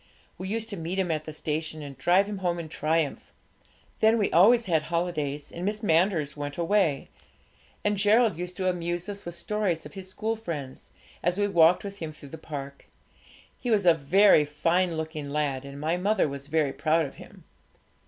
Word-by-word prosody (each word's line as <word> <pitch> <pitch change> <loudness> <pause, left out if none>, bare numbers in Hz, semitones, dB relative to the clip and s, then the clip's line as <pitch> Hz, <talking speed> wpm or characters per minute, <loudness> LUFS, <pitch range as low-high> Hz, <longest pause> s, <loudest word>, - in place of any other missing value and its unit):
We 185 - -5
used 220 +2 -2
to 200 - -4
meet 170 +3 -4
him 185 -3 0
at 155 -1 -2
the 155 - -6
station, 155 0 -4
and 140 -1 -8
drive 180 +7 +3
him 205 -1 -5
home 175 -2 0
in 165 -2 -6
triumph. 155 -1 -1 0.7
Then 220 +1 +4
we 205 - +1
always 230 +7 +6
had 165 -5 +2
holidays, 155 -4 -3
and 170 - -7
Miss 210 +3 -2
Manders 165 -5 +2
went 145 -1 -5
away, 170 -5 +1 0.8
and 210 0 +2
Gerald 215 0 +4
used 180 +2 -6
to 185 - -1
amuse 175 0 -2
us 200 -1 -7
with 175 0 -6
stories 185 -1 -1
of - - -10
his 190 -2 -8
school 220 +4 -2
friends, 155 -12 -7 0.3
as 175 +2 +1
we 205 0 +2
walked 175 -2 +4
with 200 0 -7
him 160 -2 -5
through 145 -2 -13
the 160 - -9
park. 140 -3 -8 0.7
He 245 - -4
was 210 -4 +2
a 170 - +7
very 165 +3 +5
fine 165 +4 0
looking 155 -2 -5
lad, 140 -2 -1
and 140 0 -9
my 160 +4 0
mother 195 -1 +2
was 140 0 -6
very 150 -2 +1
proud 160 +1 +1
of 135 - -10
him. - - -14
170 Hz, 195 wpm, -27 LUFS, 150-195 Hz, 0.8 s, a